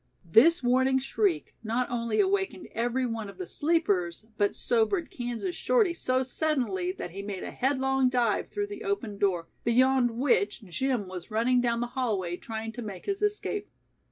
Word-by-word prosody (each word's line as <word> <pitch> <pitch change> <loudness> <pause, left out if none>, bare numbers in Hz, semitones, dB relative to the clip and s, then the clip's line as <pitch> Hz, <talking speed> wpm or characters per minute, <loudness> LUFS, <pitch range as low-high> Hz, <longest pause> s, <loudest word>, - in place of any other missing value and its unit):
This 255 - +5
warning 260 +2 +3
shriek 210 - 0
not 235 +3 0
only 230 -2 -1
awakened 385 -2 0
every 245 +3 0
one 225 -3 -3
of 195 - -12
the 180 - -4
sleepers 205 - 0
but 205 -1 +1
sobered 240 - +1
Kansas 245 +9 -3
Shorty 435 -8 +2
so 255 -5 0
suddenly 245 - -1
that 180 -2 -6
he 195 +3 -6
made 200 -2 -5
a - - -5
headlong 265 0 +1
dive 240 -4 +1
through 410 0 -2
the 410 +1 -8
open 260 - -2
door, 180 -4 +1 0.2
beyond 245 0 +3
which 240 -5 +1
Jim 225 +3 -1
was 185 0 -7
running 235 +3 +2
down 235 -1 +1
the - - +1
hallway 205 -9 -1
trying 225 +3 -5
to 240 - -7
make 200 -5 -7
his 400 0 -2
escape. 415 0 -1
240 Hz, 170 wpm, -28 LUFS, 205-265 Hz, 0.2 s, This